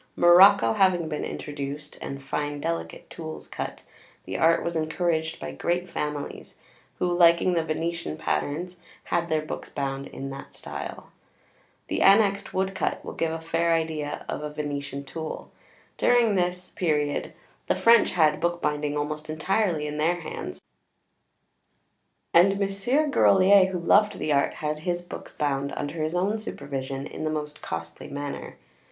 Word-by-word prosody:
Morocco 175 Hz, -, +7 dB
having 180 Hz, -4 st, +3 dB
been 150 Hz, -1 st, -3 dB
introduced, 145 Hz, 0 st, -5 dB
and 135 Hz, 0 st, -6 dB
fine 145 Hz, +1 st, -3 dB
delicate 85 Hz, -8 st, -4 dB
tools 160 Hz, -2 st, -8 dB
cut, -, -, -6 dB, 0.4 s
the 95 Hz, -, -5 dB
art 165 Hz, -, +3 dB
was 170 Hz, 0 st, -3 dB
encouraged 160 Hz, 0 st, -1 dB
by 75 Hz, -, -5 dB
great 175 Hz, -, -1 dB
families, 150 Hz, -3 st, -5 dB, 0.4 s
who, 175 Hz, -1 st, 0 dB
liking 170 Hz, +1 st, +5 dB
the 165 Hz, -2 st, +1 dB
Venetian 165 Hz, +1 st, -3 dB
patterns, 170 Hz, +3 st, -2 dB, 0.3 s
had 170 Hz, 0 st, -1 dB
their 155 Hz, -1 st, +1 dB
books 155 Hz, -, -6 dB
bound 135 Hz, -1 st, -3 dB
in 135 Hz, 0 st, -7 dB
that 135 Hz, 0 st, -9 dB
style. -, -, -7 dB, 0.8 s
The -, -, -1 dB
annexed 200 Hz, 0 st, +5 dB
|xiv| -, -, -15 dB
woodcut 190 Hz, 0 st, -1 dB
will -, -, -6 dB
give 165 Hz, -1 st, -1 dB
a 165 Hz, -, -3 dB
fair 165 Hz, +1 st, +1 dB
idea 155 Hz, -2 st, -3 dB
of -, -, -3 dB
a 150 Hz, -, -4 dB
Venetian 145 Hz, -2 st, -4 dB
tool. 160 Hz, +3 st, -6 dB, 0.5 s
During 240 Hz, -3 st, +4 dB
this 180 Hz, -1 st, -1 dB
period 150 Hz, -4 st, -1 dB, 0.3 s
the -, -, +2 dB
French 230 Hz, 0 st, +5 dB
had 155 Hz, -4 st, +3 dB
bookbinding 150 Hz, -4 st, 0 dB
almost 150 Hz, +1 st, -3 dB
entirely 170 Hz, 0 st, 0 dB
in 150 Hz, 0 st, -4 dB
their 170 Hz, +3 st, +1 dB
hands, 155 Hz, -, -6 dB, 1.7 s
and 195 Hz, +3 st, +5 dB
Mons. 195 Hz, 0 st, -2 dB, 0.2 s
Grolier, 195 Hz, -5 st, +6 dB
who 185 Hz, -, -2 dB
loved 205 Hz, +4 st, +3 dB
the 150 Hz, -1 st, 0 dB
art, 140 Hz, 0 st, +2 dB
had 150 Hz, 0 st, -3 dB
his 175 Hz, +2 st, -2 dB
books 175 Hz, -, -9 dB
bound 140 Hz, -1 st, -1 dB
under 150 Hz, +3 st, -3 dB
his 155 Hz, +2 st, -1 dB
own 200 Hz, +5 st, +1 dB
supervision 135 Hz, -9 st, -5 dB
in -, -, -7 dB
the 155 Hz, -, 0 dB
most 150 Hz, -1 st, -4 dB
costly 85 Hz, 0 st, -6 dB
manner. 145 Hz, 0 st, -6 dB
160 Hz, 150 wpm, -26 LUFS, 145-175 Hz, 1.7 s, Morocco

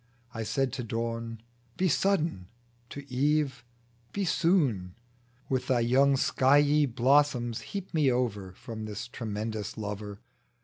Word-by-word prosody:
I 115 Hz, -, -4 dB
said 125 Hz, +4 st, -1 dB
to 130 Hz, -3 st, -3 dB
dawn, 115 Hz, 0 st, -4 dB, 0.3 s
Be 185 Hz, -, +2 dB
sudden; 165 Hz, -, +1 dB, 0.4 s
to 140 Hz, 0 st, -8 dB
eve, 135 Hz, -1 st, 0 dB, 0.5 s
Be 200 Hz, -1 st, -1 dB
soon; 135 Hz, -, +1 dB, 0.5 s
With 130 Hz, -1 st, -1 dB
thy 125 Hz, -2 st, +2 dB
young 135 Hz, +4 st, +4 dB
skiey 145 Hz, +3 st, +4 dB
blossoms 125 Hz, -1 st, +2 dB
heap 195 Hz, -2 st, -7 dB
me 150 Hz, -5 st, +3 dB
over 105 Hz, -7 st, -1 dB
From 110 Hz, +3 st, -7 dB
this 105 Hz, +1 st, -5 dB
tremendous 110 Hz, -2 st, -4 dB
Lover 105 Hz, -1 st, -5 dB
I -, -, -37 dB
125 Hz, 130 wpm, -29 LUFS, 110-145 Hz, 0.5 s, young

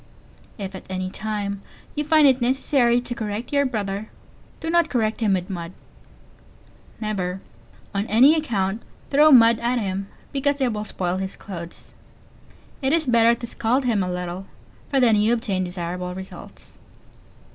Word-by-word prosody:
If 195 Hz, -2 st, -5 dB
at 190 Hz, -, -10 dB
any 185 Hz, 0 st, -3 dB
time 200 Hz, -1 st, -3 dB, 0.3 s
you 295 Hz, -, -1 dB
find 310 Hz, 0 st, +5 dB
it 265 Hz, -2 st, +4 dB
necessary 245 Hz, -1 st, +2 dB
to 245 Hz, -, -4 dB
correct 220 Hz, +3 st, -5 dB
your 280 Hz, -1 st, +3 dB
brother, 205 Hz, -3 st, -3 dB, 0.5 s
do 325 Hz, 0 st, -3 dB
not 340 Hz, -1 st, +3 dB
correct 220 Hz, -3 st, 0 dB
him 215 Hz, -4 st, +2 dB
with 180 Hz, -1 st, -3 dB
mud 175 Hz, -2 st, -6 dB, 1.3 s
never, 195 Hz, -4 st, -2 dB, 0.5 s
on 200 Hz, +2 st, -1 dB
any 255 Hz, +8 st, +6 dB
account, 220 Hz, -9 st, -1 dB, 0.3 s
throw 300 Hz, +2 st, +6 dB
mud 230 Hz, -3 st, +7 dB
at 240 Hz, +2 st, 0 dB
him, 195 Hz, -3 st, -2 dB, 0.3 s
because 285 Hz, +1 st, 0 dB
it 255 Hz, -4 st, +1 dB
will 210 Hz, 0 st, -4 dB
spoil 180 Hz, -3 st, -2 dB
his 190 Hz, 0 st, -4 dB
clothes. 170 Hz, -3 st, -9 dB, 0.9 s
It 270 Hz, +1 st, +1 dB
is 325 Hz, -1 st, +2 dB
better 235 Hz, -2 st, +4 dB
to 235 Hz, -, -7 dB
scald 240 Hz, +3 st, 0 dB
him 225 Hz, -5 st, +2 dB
a 180 Hz, -, -1 dB
little, 180 Hz, +1 st, -5 dB, 0.4 s
for 275 Hz, -, +2 dB
then 230 Hz, -4 st, +5 dB
you 215 Hz, +3 st, +3 dB
obtain 210 Hz, -6 st, -1 dB
desirable 180 Hz, 0 st, -4 dB
results. 190 Hz, 0 st, -10 dB
220 Hz, 155 wpm, -23 LUFS, 190-255 Hz, 1.3 s, mud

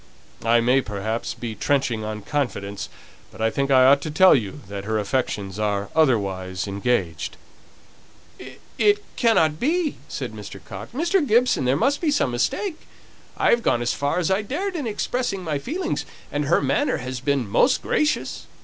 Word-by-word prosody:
I 115 Hz, +1 st, +4 dB
may, 125 Hz, +3 st, +3 dB
perhaps, 110 Hz, +1 st, -3 dB
be 115 Hz, -2 st, -5 dB
trenching 120 Hz, -1 st, 0 dB
on 105 Hz, -1 st, -5 dB
confidence, 105 Hz, -7 st, -3 dB, 0.4 s
but -, -, -15 dB
I 110 Hz, 0 st, +1 dB
think 140 Hz, +3 st, -1 dB
I 130 Hz, -1 st, +6 dB
ought 140 Hz, +1 st, +6 dB
to 155 Hz, -, -4 dB
tell 185 Hz, +5 st, +6 dB
you 120 Hz, +3 st, -1 dB
that 100 Hz, 0 st, -6 dB
her 110 Hz, +1 st, 0 dB
affections 105 Hz, -3 st, -2 dB
are 100 Hz, -1 st, -1 dB
otherwise 95 Hz, -, +1 dB
engaged." 100 Hz, -5 st, -1 dB, 1.4 s
"It 415 Hz, 0 st, +3 dB
cannot 160 Hz, -, +3 dB
be!" 320 Hz, +2 st, 0 dB
said -, -, -5 dB
Mr. -, -, -9 dB
Coxe. -, -, -9 dB
"Mr. 340 Hz, +6 st, +1 dB
Gibson, 235 Hz, -, +3 dB
there 130 Hz, +2 st, +2 dB
must 275 Hz, -, +1 dB
be 330 Hz, -, +1 dB
some 285 Hz, -, +1 dB
mistake. 315 Hz, -, -2 dB, 0.5 s
I -, -, +3 dB
have 235 Hz, -, +3 dB
gone 120 Hz, -, +1 dB
as 120 Hz, -, 0 dB
far 145 Hz, +3 st, -1 dB
as 180 Hz, 0 st, 0 dB
I 190 Hz, +2 st, +2 dB
dared 355 Hz, -, -3 dB
in 290 Hz, -7 st, -2 dB
expressing 220 Hz, -2 st, -2 dB
my 155 Hz, -4 st, -2 dB
feelings, 335 Hz, -, -3 dB, 0.3 s
and 145 Hz, 0 st, -1 dB
her 150 Hz, 0 st, +2 dB
manner 135 Hz, -, +1 dB
has 130 Hz, 0 st, -5 dB
been 135 Hz, -2 st, 0 dB
most 250 Hz, -, +3 dB
gracious. 300 Hz, 0 st, 0 dB
140 Hz, 170 wpm, -23 LUFS, -, 1.4 s, I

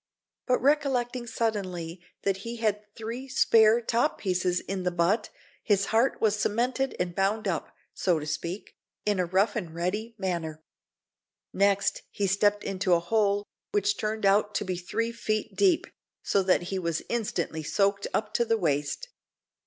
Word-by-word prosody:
But 250 Hz, -, +3 dB
recollecting 260 Hz, -4 st, +1 dB
suddenly 185 Hz, -7 st, -2 dB, 0.2 s
that 195 Hz, -1 st, +1 dB
he 230 Hz, +4 st, -6 dB
had 215 Hz, -3 st, 0 dB
three 230 Hz, +4 st, -5 dB
spare 225 Hz, -3 st, +5 dB
top 235 Hz, +1 st, +1 dB
pieces 180 Hz, -2 st, 0 dB
in 195 Hz, -1 st, -4 dB
the 180 Hz, -, +1 dB
butt, 180 Hz, +5 st, +1 dB, 0.3 s
his 200 Hz, -2 st, +2 dB
heart 235 Hz, +4 st, +3 dB
was 215 Hz, -2 st, +3 dB
cemented 250 Hz, +6 st, 0 dB
and 180 Hz, -1 st, -1 dB
bound 200 Hz, +3 st, 0 dB
up, 170 Hz, -5 st, -2 dB, 0.2 s
so 180 Hz, -3 st, +1 dB
to 150 Hz, -, -4 dB
speak, 170 Hz, +5 st, -4 dB, 0.3 s
in 205 Hz, -2 st, +1 dB
a 180 Hz, -, +1 dB
rough 190 Hz, +5 st, +2 dB
and 175 Hz, -8 st, -4 dB
ready 210 Hz, +7 st, -2 dB
manner. 165 Hz, -5 st, -3 dB, 0.9 s
Next, 200 Hz, 0 st, +2 dB
he 205 Hz, -, -2 dB
stepped 205 Hz, +2 st, +2 dB
into 185 Hz, -2 st, +1 dB
a -, -, +2 dB
hole, 205 Hz, +2 st, +1 dB, 0.3 s
which 205 Hz, 0 st, +2 dB
turned 215 Hz, 0 st, -2 dB
out 205 Hz, +1 st, +3 dB
to -, -, 0 dB
be 185 Hz, -1 st, -2 dB
three 230 Hz, +6 st, -2 dB
feet 215 Hz, -2 st, -2 dB
deep, 370 Hz, -2 st, +3 dB, 0.4 s
so 200 Hz, -, +2 dB
that 185 Hz, -1 st, +2 dB
he 190 Hz, -, 0 dB
was 170 Hz, -3 st, -2 dB
instantly 180 Hz, -8 st, -2 dB
soaked 200 Hz, +5 st, +1 dB
up 215 Hz, 0 st, -1 dB
to -, -, +3 dB
the 225 Hz, -1 st, +1 dB
waist. 155 Hz, -, -1 dB
200 Hz, 160 wpm, -28 LUFS, 180-225 Hz, 0.9 s, spare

